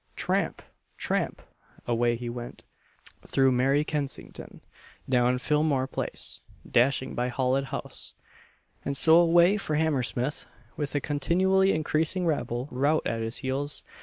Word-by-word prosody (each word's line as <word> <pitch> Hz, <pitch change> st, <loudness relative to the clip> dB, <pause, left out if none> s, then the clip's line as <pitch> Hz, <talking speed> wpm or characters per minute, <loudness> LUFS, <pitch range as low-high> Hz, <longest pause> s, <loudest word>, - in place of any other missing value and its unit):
Tramp! -, -, -1 dB, 0.3 s
tramp! -, -, -2 dB, 0.4 s
away 120 Hz, 0 st, +1 dB
he 120 Hz, +1 st, -6 dB
went, 120 Hz, 0 st, -7 dB, 0.6 s
through 135 Hz, -1 st, +2 dB
merry 135 Hz, +4 st, +2 dB
Kensington, 150 Hz, -3 st, -5 dB, 0.5 s
down 125 Hz, -1 st, +3 dB
Phillimore 150 Hz, -1 st, +1 dB
Place, 135 Hz, -, -4 dB, 0.3 s
dashing 130 Hz, +2 st, +2 dB
by 125 Hz, +1 st, -1 dB
Holland 130 Hz, +2 st, 0 dB
House, -, -, -6 dB, 0.7 s
and 140 Hz, -1 st, -3 dB
so 160 Hz, +5 st, +6 dB
away 175 Hz, +3 st, +5 dB
for 155 Hz, -6 st, -2 dB
Hammersmith, 145 Hz, -3 st, -1 dB, 0.3 s
with 145 Hz, -1 st, -3 dB
a 145 Hz, -, +1 dB
continually 190 Hz, +6 st, +2 dB
increasing 160 Hz, +3 st, 0 dB
rabble 130 Hz, -5 st, -1 dB
rout 145 Hz, +5 st, +1 dB
at 115 Hz, 0 st, -1 dB
his 115 Hz, +1 st, -3 dB
heels. 140 Hz, +3 st, -1 dB
140 Hz, 125 wpm, -27 LUFS, 125-155 Hz, 0.7 s, so